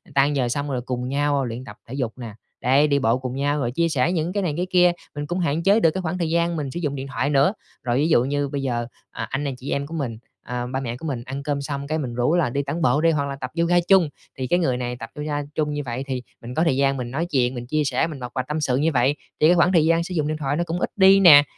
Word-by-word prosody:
tan 140 +1 +3
giờ 125 -3 +1
xong 145 +3 -2
rồi 125 -2 -1
cùng 125 0 -3
nhau 140 -1 +1
luyện 120 +1 -5
tập 105 -4 -11
thể 120 - -8
dục 130 -4 -3
nè, 115 -4 -7 0.3
đấy, 135 +4 +4
đi 140 -1 +2
bộ 115 -1 +2
cùng 130 0 -5
nhau, 145 +2 0
rồi 120 -3 -1
chia 165 +6 +1
sẻ 155 +2 +1
những 170 0 -1
cái 200 -1 0
này 165 -5 0
cái 180 +1 -1
kia, 180 -1 +5 0.2
mình 145 0 -3
cũng 175 +3 -2
hạn 165 -1 0
chế 200 +4 +5
được 165 -7 +4
cái 190 - -3
khoảng 175 0 -2
thời 170 -3 -1
gian 170 +1 +1
mình 145 -4 -3
sử 170 - -4
dụng 145 -4 -2
điện 135 0 -5
thoại 140 +1 -1
nữa. 145 +6 +3 0.3
Rồi 120 0 0
ví 155 +4 +2
dụ 125 -6 +4
như 145 +1 -1
bây 140 0 -3
giờ, 120 -3 -2 0.2
à, - - -5
anh 135 +2 -2
nè 140 - -1
chị 130 +2 -6
em 140 0 -1
của 165 - -9
mình, 135 -8 -3 0.3
ờ, 125 0 -3
ba 130 +1 -2
mẹ 120 -2 -4
của 160 - -9
mình 125 -5 -3
ăn 135 +2 -5
cơm 145 -1 -1
xong 140 0 -4
cái 155 +1 -1
mình 130 -6 -3
rủ 125 +8 +2
là 165 -8 +2
đi 140 +3 -1
tản 145 +5 -3
bộ 150 -2 +3
đi, 165 0 +4
hoặc 145 -2 0
là 140 -1 -4
tập 130 -2 -6
yoga 170 +1 +3
chung, 185 -6 +5 0.3
thì 130 -1 -3
cái 175 +7 +2
người 130 -7 +1
này 125 -1 -3
tập 115 - -7
yoga 150 0 -2
chung 150 -1 0
như 145 - -2
vậy 125 +2 -3
thì 130 -2 -2 0.2
mình 120 +2 -7
có 160 - +2
thời 165 -6 +2
gian 140 0 +2
mình 120 -1 -5
nói 160 +5 -1
chuyện, 130 -6 0
mình 120 0 -6
chia 155 +3 +1
sẻ, 145 - +1
mình 155 -4 -7
bộc 125 -1 -6
bạch 130 0 -2
tâm 150 +1 -2
sự 130 -3 +1
như 155 +4 +2
vậy, 135 +1 +2 0.2
thì 155 - +5
cái 175 - +5
khoảng 175 +1 +4
thời 160 -2 +5
gian 165 +1 +3
sử 180 - -6
dụng 155 -4 0
điện 155 0 -2
thoại 145 -1 -1
nó 170 - 0
cũng 170 +1 -3
ít - - -1
đi 195 0 +7
nè. 155 -7 +9
145 Hz, 315 wpm, -23 LUFS, 130-160 Hz, 0.3 s, nè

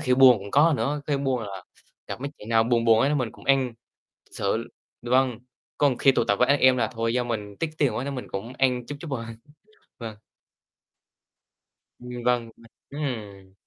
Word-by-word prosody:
khi 125 0 +2
buồn 130 -3 +7
cũng 100 +1 -9
có 155 +6 +5
nữa, 145 +1 -1
khi 145 - +1
buồn 135 -4 -1
là 95 -3 -7 0.4
gặp - - -6
mấy 140 - -4
chuyện 105 - -11
nào 115 -1 +4
buồn 115 -1 +1
buồn 115 -1 +5
ấy 140 +4 +2
mình 125 -6 -1
cũng - - -16
ăn, 135 -3 +2 0.5
thực - - -29
sự. - - -1 0.3
Vâng, 125 -1 +2 0.4
còn 140 -4 +2
khi 135 - +5
tụ 120 - +1
tập 100 - +1
với 125 - +3
anh 140 0 +3
em 130 0 +6
là 115 - +1
thôi, 115 0 -1
do 125 0 +1
mình 105 -4 -4
tiếc 165 -1 -1
tiền 140 -4 +2
quá 125 - -2
nên 140 - -4
mình 125 - -6
cũng 105 +6 -5
ăn 125 -2 +1
chút 145 - -6
chút 165 - -7
thôi. 120 -4 -3 0.7
Vâng. 115 -3 -7 1.8
Ừm, 125 -1 -7
vâng, 120 -2 +1
ừm, 115 - -18 0.3
ừm. 105 -9 -5
125 Hz, 205 wpm, -25 LUFS, 115-135 Hz, 1.8 s, buồn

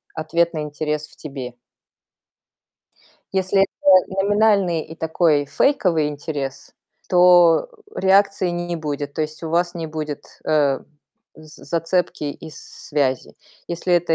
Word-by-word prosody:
ответный 165 0 0
интерес 150 0 -3
в - - -20
тебе. 135 -5 -7 1.8
Если 190 +1 +2
это 190 0 +3
номинальный 200 -5 +2
и 160 - -11
такой 160 -2 +1
фейковый 175 - +2
интерес, 145 -2 -6 0.4
то 175 - +5 0.3
реакции 195 -1 +3
не 175 0 -3
не 175 -1 -3
будет. 145 -2 -4
То 155 - -1
есть 155 +2 -6
у 160 - -4
вас 175 +1 +1
не 165 -2 -5
будет, 155 -2 -7
э, 145 -3 +2 0.6
з 155 0 -15
зацепки 170 -1 -1
и 160 - -11
с 155 - -12 0.3
связи. 135 -4 -1 0.3
Если 175 +1 -2
это 170 -1 +3
165 Hz, 125 wpm, -21 LUFS, 150-180 Hz, 1.8 s, то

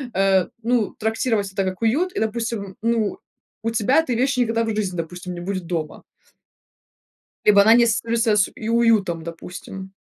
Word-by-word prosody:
э, 190 -1 +3 0.2
ну, 235 -2 0
трактировать 220 -2 0
это 195 - 0
как 185 +2 -4
уют. 315 +12 +1
И, - - -2
допустим, 220 -3 -3
ну, 230 -3 0 0.4
у 230 - 0
тебя 230 +3 +2
этой 260 -7 -1
вещи 255 +2 +1
никогда 230 -1 +1
в 225 -1 -2
жизни, 195 -4 -2
допустим, 180 +2 -5
не - - -6
будет 185 -1 -4
дома. 165 -3 -4 1.4
Либо 200 -1 +7
она 220 +2 +6
не 240 0 +6
ассоциируется 230 0 +1
с 205 - +2
и 220 - -6
уютом, 220 -8 +2
допустим. 180 +3 -8
215 Hz, 165 wpm, -22 LUFS, 190-230 Hz, 1.4 s, Либо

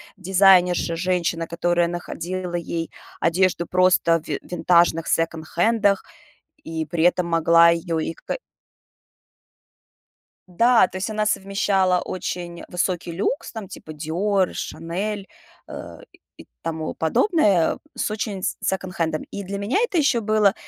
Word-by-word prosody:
дизайнерша, 185 -3 +4
женщина, 170 -2 -1
которая 175 +1 +1
находила 175 +1 -5
ей 170 -1 -3 0.3
одежду 175 0 +1
просто 180 -2 +3
ви 145 - -3
в - - -18
винтажных 170 -2 +3
секонд-хендах, 175 +6 +1 0.6
и 160 -1 -4
при 160 +2 -1
этом 180 0 +2
могла 165 0 +5
её 170 -1 0
и 160 - -3
какэ. - - -6 2.1
Да, 230 +4 +4
то 185 - -8
есть 190 +4 -3
она 215 -1 -1
совмещала 195 -2 +1
очень 175 -1 -5
высокий 180 -1 -2
люкс, 200 +11 -2
там, 220 -4 -7
типа 155 - -10
Dior, 180 +5 0
Chanel, 195 +5 -4 0.4
э, - - -9 0.2
и - - -22 0.2
и - - -13 0.2
тому 160 -1 -3
подобное, 195 - +2 0.2
с - - -2
очень 210 -3 -4
с - - -1
секонд-хендом. 180 -4 -2
И 200 - -5
для 200 +1 -5
меня 200 - -1
это 475 -7 0
еще 280 -6 +3
было, 215 -2 +3
180 Hz, 130 wpm, -23 LUFS, 170-200 Hz, 2.1 s, могла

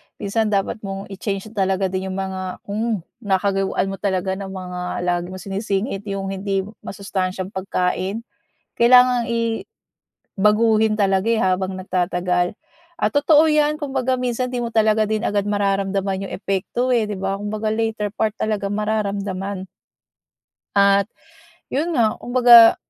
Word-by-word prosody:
minsan 220 +2 -1
dapat 200 0 0
mong 195 -1 -6
i-change 195 +1 -4
talaga 190 -3 0
din 190 0 -2
yung 190 - -4
mga 190 -1 -4
hmm, 215 -2 -2 0.2
nakagawian 195 -2 0
mo 195 - -5
talaga 190 -2 -1
na 195 - -5
mga 180 -2 -5
lagi 175 0 0
mong 185 0 -8
sinisingit 195 +1 -2
yung 195 -1 -3
hindi 195 0 -1 0.2
masustansyang 190 -1 -4
pagkain. 190 +2 -2 0.5
Kailangang 245 0 +5
i 230 -1 -1 0.7
baguhin 215 +1 +3
talaga, 195 0 +2
eh, 230 - +2
habang 185 -1 0
nagtatagal 180 -1 0 0.5
at - - +1
totoo 295 +2 +5
yan 300 -1 +2
kumbaga 265 -3 -1
minsan 250 0 -1
di 250 - -3
mo 240 -1 -2
talaga 215 -1 +3
din 215 0 -1
agad 205 -3 0
mararamdaman 195 -1 0
yung - - -7
epekto, 195 +6 -2
eh, 235 -3 +3
'di 210 - -4
ba? 195 0 -2
Kumbaga 210 +1 -3
later 220 -1 -1
part 215 +1 -1
talagang 205 -2 -1
mararamdaman. 200 -2 -2 1.1
At 200 +1 +4 0.6
yun 320 +5 0
nga 220 -4 +2
kumbaga 240 -2 +7
200 Hz, 140 wpm, -21 LUFS, 190-225 Hz, 1.1 s, kumbaga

